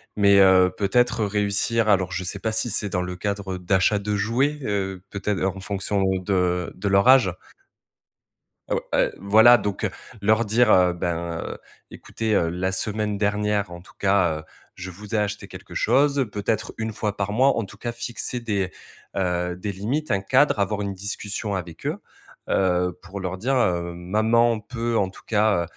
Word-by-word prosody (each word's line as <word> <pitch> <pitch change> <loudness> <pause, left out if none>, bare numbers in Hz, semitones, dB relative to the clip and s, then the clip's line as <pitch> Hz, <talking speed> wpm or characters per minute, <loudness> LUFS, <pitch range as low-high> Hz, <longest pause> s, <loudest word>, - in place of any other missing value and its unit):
mais 100 -1 +5
heu, 95 -1 +6
peut-être 115 +2 +2
réussir 105 +2 0
alors 95 -3 +2
je 95 - -3
sais 95 +2 -4
pas 110 +1 -2
si 115 +2 +2
c'est 105 0 0
dans 90 -1 -1
le 90 0 -5
cadre, 100 -1 -3
heu, - - -7
d'achat 95 +3 +2
de 105 +1 -2
jouets, 120 +9 0
heu, 95 -4 -2
peut 100 - -6
être 105 -3 0
en 95 0 -1
fonction 100 +1 -2
de 90 -2 0
de 100 +2 -4
leur 100 +5 +4
âge 125 -9 +6 1.4
heu, - - +3
ou - - -1 0.2
et - - +2
voilà, 110 +5 +6
donc 105 -4 -4
heu, - - +1 0.3
leur 110 +3 +3
dire: 110 +2 +3
«Heu, 90 -1 +5
ben, 85 -1 -3
heu, - - -6 0.3
écoutez, 110 -1 -4
heu, 85 - +2
la 90 +2 -2
semaine 105 +1 -1
dernière, 105 -1 0
en 85 0 -9
tout - - -19
cas, 95 -5 +2
heu, 80 - -11 0.3
je 90 +1 -7
vous 105 +4 -7
ai - - +3
acheté 105 0 -2
quelque - - -11
chose» 140 -2 +2
peut 105 -1 -5
être 110 -1 -1
1 110 -1 -3
fois 105 -2 -3
par 100 0 -2
mois, 130 +5 +4
en 115 - -1
tout 100 +1 -14
cas, 120 +3 -4
fixer 120 +1 -4
des, 100 -5 -2 0.5
heu, 90 -1 -1
des 100 +3 -4
limites, 120 +11 -3
un 100 - +1
cadre, 130 +2 +3
avoir 105 +1 0
une 100 -1 -3
discussion 100 +1 -4
avec 85 -3 -7
eux, - - -1 0.5
heu, 90 -1 +1
pour 95 +2 -8
leur 95 0 -4
dire: 130 +7 0
«Heu, 85 -6 0
maman 110 +6 +2
peut 115 0 -2
en 95 -1 +1
tout - - -15
cas, 105 -4 +2
100 Hz, 195 wpm, -23 LUFS, 95-110 Hz, 1.4 s, heu